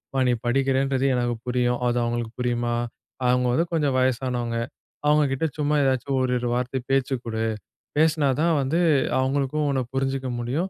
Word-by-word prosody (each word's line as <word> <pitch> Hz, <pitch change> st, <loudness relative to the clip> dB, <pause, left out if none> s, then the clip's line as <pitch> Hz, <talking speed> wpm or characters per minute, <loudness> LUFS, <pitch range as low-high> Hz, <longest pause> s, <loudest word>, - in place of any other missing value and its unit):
மா -, -, +2 dB
நீ -, -, +3 dB
படிக்கிறேன்றது 135 Hz, +1 st, +1 dB
எனக்கு 120 Hz, -1 st, 0 dB
புரியும், 125 Hz, 0 st, +1 dB
அது 120 Hz, -, 0 dB
அவங்களுக்கு 120 Hz, -1 st, -3 dB
புரியுமா? 120 Hz, -1 st, 0 dB, 0.5 s
அவங்க 125 Hz, 0 st, +3 dB
வந்து 165 Hz, +6 st, +2 dB
கொஞ்சம் 145 Hz, -5 st, +1 dB
வயசானவங்க. 125 Hz, -2 st, 0 dB, 0.5 s
அவங்க 150 Hz, 0 st, +5 dB
கிட்ட 135 Hz, +4 st, 0 dB
சும்மா 150 Hz, 0 st, +1 dB
ஏதாச்சும் 135 Hz, +1 st, 0 dB
ஒரு 130 Hz, -1 st, 0 dB
இரு 120 Hz, -, -2 dB
வார்த்த 125 Hz, +1 st, -1 dB
பேச்சு 135 Hz, -1 st, +1 dB
கொடு. 110 Hz, -1 st, -2 dB, 0.5 s
பேசினா 155 Hz, -1 st, +3 dB
தான் 165 Hz, 0 st, +3 dB
வந்து 140 Hz, +6 st, 0 dB, 0.4 s
அவங்களுக்கும் 140 Hz, +3 st, 0 dB
உன்ன 135 Hz, -2 st, +1 dB
புரிஞ்சுக்க 135 Hz, 0 st, -1 dB
முடியும். 135 Hz, +11 st, -2 dB
130 Hz, 155 wpm, -24 LUFS, 125-140 Hz, 0.5 s, அவங்க